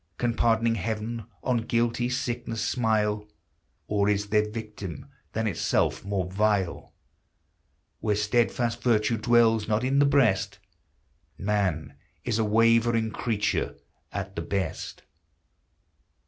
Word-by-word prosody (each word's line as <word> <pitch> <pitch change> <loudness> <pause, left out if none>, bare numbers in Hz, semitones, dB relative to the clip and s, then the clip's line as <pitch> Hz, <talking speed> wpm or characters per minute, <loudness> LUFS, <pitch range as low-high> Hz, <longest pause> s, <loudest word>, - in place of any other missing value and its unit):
Can 120 -1 0
pardoning 115 0 +2
Heaven 110 +2 -3 0.2
on 125 -2 +1
guilty 115 +1 0
sickness 120 -3 -2
smile? 105 -3 0 0.6
Or 105 -1 +1
is 105 0 0
there 105 0 +2
victim 105 -7 -7 0.3
than 110 +1 -1
itself 100 -6 0
more 100 -2 -1
vile? 95 -1 -1 1.0
Where 105 -2 0
steadfast 115 +3 +1
virtue 115 -1 +2
dwells 115 -1 +3
not 110 +2 +1
in 135 +2 +2
the 145 - +5
breast, 105 -9 +2 0.8
Man 100 -6 -1 0.3
is 115 -2 -1
a - - +3
wavering 115 +1 +3
creature 110 -2 -1 0.4
at 100 -1 -5
the 85 - -2
best 90 -1 -4
110 Hz, 115 wpm, -27 LUFS, 105-115 Hz, 1.0 s, the